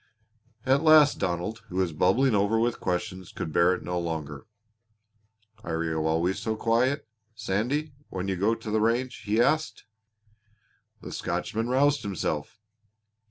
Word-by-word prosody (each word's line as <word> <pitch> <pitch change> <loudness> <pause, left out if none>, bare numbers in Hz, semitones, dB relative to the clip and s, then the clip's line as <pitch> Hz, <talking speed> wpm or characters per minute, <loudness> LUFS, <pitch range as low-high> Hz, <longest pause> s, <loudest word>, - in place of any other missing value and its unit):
At 135 +2 +3
last 155 -2 +6
Donald, 90 +6 -2
who 90 - -8
was 90 -3 0
bubbling 110 - +3
over 105 +2 +2
with 120 +1 0
questions, 90 0 -3
could 80 - -5
bear 90 +3 +4
it - - -9
no 90 0 -2
longer. 80 0 -5 1.2
"Are 80 -7 -2
you 80 -1 -1
always 85 +4 0
so 110 -1 -2
quiet, 120 +4 +1 0.3
Sandy, 120 +9 -1 0.2
when 95 0 -4
you 95 - 0
go 100 +5 +1
to 115 -1 -7
the 110 0 +1
range?" 120 +3 0
he 105 +2 +1
asked. 155 +5 +1 1.2
The - - -8
Scotchman 115 +2 -2
roused 140 +3 +3
himself. 90 -3 -3
105 Hz, 145 wpm, -27 LUFS, 90-120 Hz, 1.2 s, last